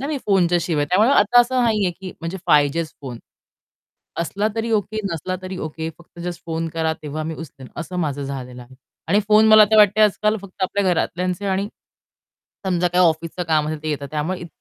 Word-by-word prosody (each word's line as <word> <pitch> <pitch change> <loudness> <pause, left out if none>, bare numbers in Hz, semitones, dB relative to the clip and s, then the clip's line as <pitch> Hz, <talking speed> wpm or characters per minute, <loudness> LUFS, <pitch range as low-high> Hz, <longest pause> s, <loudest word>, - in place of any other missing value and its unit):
ना 275 - -3
मी 300 -1 -2
फोनच्या 180 -3 +3
शिवाय, 155 -4 0
त्यामुळे 210 - +3
आता 240 +4 +6
असं 250 +1 +1
नाहीये 210 -5 +2
की 190 -1 -6
म्हणजे 165 +3 -5
पाहिजेच 150 +1 +2
फोन. 125 -5 -7 1.0
असला 200 +5 -1
तरी 225 0 -2
ओके, 215 0 -1
नसला 170 +3 -3
तरी 185 0 -6
ओके. 160 0 -5
फक्त 175 0 -17
जस्ट 175 -2 -5
फोन 165 0 -3
करा 160 -1 0
तेव्हा 155 +1 -5
मी 160 0 -4
उचलेन 135 -5 -10
असं 175 +2 -6
माझं 145 -3 -2
झालेलं 125 -2 -7
आहे. 125 +2 -15 0.3
आणि 200 +5 +3
फोन 215 +1 +6
मला 215 0 +8
आता 215 +1 +3
वाटतंय 210 +1 +6
आजकाल 210 +1 +2
फक्त 195 0 -13
आपल्या 200 +2 0
घरातल्यांचे 180 +3 -1
आणि 195 +1 0 1.0
समजा 180 -1 +1
काही 180 +1 +3
ऑफिसचं 165 +2 -1
काम 155 -2 +2
असेल, 155 -1 -4
ते 155 - -2
येतात 140 -2 -3
त्यामुळे 155 +5 -2
इत 175 - -8
175 Hz, 195 wpm, -21 LUFS, 155-200 Hz, 1.0 s, मला